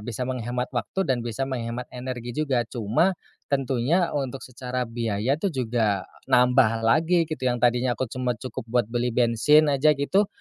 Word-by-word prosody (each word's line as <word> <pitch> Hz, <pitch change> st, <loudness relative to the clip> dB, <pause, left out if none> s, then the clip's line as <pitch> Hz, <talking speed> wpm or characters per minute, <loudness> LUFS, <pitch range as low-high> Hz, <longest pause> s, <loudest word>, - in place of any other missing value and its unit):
bisa 120 Hz, +3 st, -4 dB
menghemat 125 Hz, 0 st, -3 dB
waktu 125 Hz, -, -2 dB
dan 125 Hz, -2 st, 0 dB
bisa 120 Hz, +2 st, -3 dB
menghemat 120 Hz, -2 st, -4 dB
energi 125 Hz, -1 st, -5 dB
juga. 135 Hz, -4 st, 0 dB
Cuma 120 Hz, -, +1 dB, 0.3 s
tentunya 135 Hz, +5 st, +1 dB
untuk 135 Hz, -2 st, -3 dB
secara 125 Hz, 0 st, -4 dB
biaya 115 Hz, +3 st, -1 dB
tu 200 Hz, -, -1 dB
juga 110 Hz, -6 st, 0 dB, 0.2 s
nambah 125 Hz, -2 st, +4 dB
lagi 165 Hz, +9 st, +3 dB
gitu, 130 Hz, -5 st, -3 dB
yang 120 Hz, -1 st, 0 dB
tadinya 125 Hz, +1 st, +2 dB
aku 125 Hz, -2 st, -3 dB
cuma 125 Hz, -1 st, -1 dB
cukup 115 Hz, +1 st, -7 dB
buat 120 Hz, -1 st, +1 dB
beli 120 Hz, 0 st, -1 dB
bensin 125 Hz, +6 st, +4 dB
aja 150 Hz, +2 st, +4 dB
gitu. 185 Hz, +9 st, +1 dB
125 Hz, 160 wpm, -25 LUFS, 120-135 Hz, 0.3 s, nambah